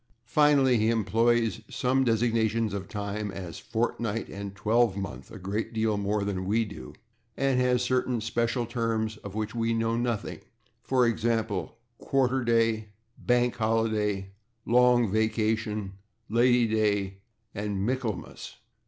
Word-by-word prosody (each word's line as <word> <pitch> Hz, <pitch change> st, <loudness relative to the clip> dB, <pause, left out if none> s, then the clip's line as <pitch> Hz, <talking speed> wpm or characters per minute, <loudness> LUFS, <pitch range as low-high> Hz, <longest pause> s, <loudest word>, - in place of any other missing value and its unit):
Finally, 135 Hz, -1 st, +4 dB
he 110 Hz, +1 st, +2 dB
employs 115 Hz, +1 st, +2 dB
such 130 Hz, +1 st, +1 dB
designations 115 Hz, -2 st, +1 dB
of 95 Hz, -2 st, -5 dB
time 105 Hz, 0 st, -4 dB
as 90 Hz, -3 st, -7 dB
/fortnight/ 115 Hz, -1 st, -2 dB
and 100 Hz, 0 st, -6 dB
/twelvemonth/ 105 Hz, -2 st, 0 dB
a -, -, -9 dB
great 105 Hz, +4 st, -3 dB
deal 110 Hz, -1 st, +1 dB
more 100 Hz, +1 st, -1 dB
than 95 Hz, -2 st, -2 dB
we 110 Hz, +3 st, +2 dB
do, 105 Hz, -1 st, -9 dB, 0.5 s
and 135 Hz, -2 st, +2 dB
has 125 Hz, -1 st, +2 dB
certain 125 Hz, -1 st, 0 dB
special 115 Hz, +2 st, -1 dB
terms 115 Hz, -2 st, -2 dB
of 100 Hz, -1 st, -9 dB
which 110 Hz, 0 st, -3 dB
we 115 Hz, -1 st, 0 dB
know 115 Hz, 0 st, 0 dB
nothing, 120 Hz, -2 st, -2 dB, 0.4 s
for 130 Hz, -2 st, +2 dB
example, 115 Hz, -5 st, -1 dB, 0.2 s
/quarter 130 Hz, -1 st, +1 dB
day/, 115 Hz, -2 st, +2 dB, 0.4 s
/bank 125 Hz, 0 st, +2 dB
holiday/, 110 Hz, -4 st, 0 dB, 0.3 s
/long 120 Hz, -2 st, +4 dB
vacation/, 110 Hz, -2 st, 0 dB, 0.4 s
/Lady 120 Hz, +1 st, +4 dB
Day/ 105 Hz, -3 st, 0 dB, 0.3 s
and 100 Hz, -1 st, -2 dB
/Michaelmas 120 Hz, -7 st, -4 dB
115 Hz, 125 wpm, -27 LUFS, 105-120 Hz, 0.5 s, Finally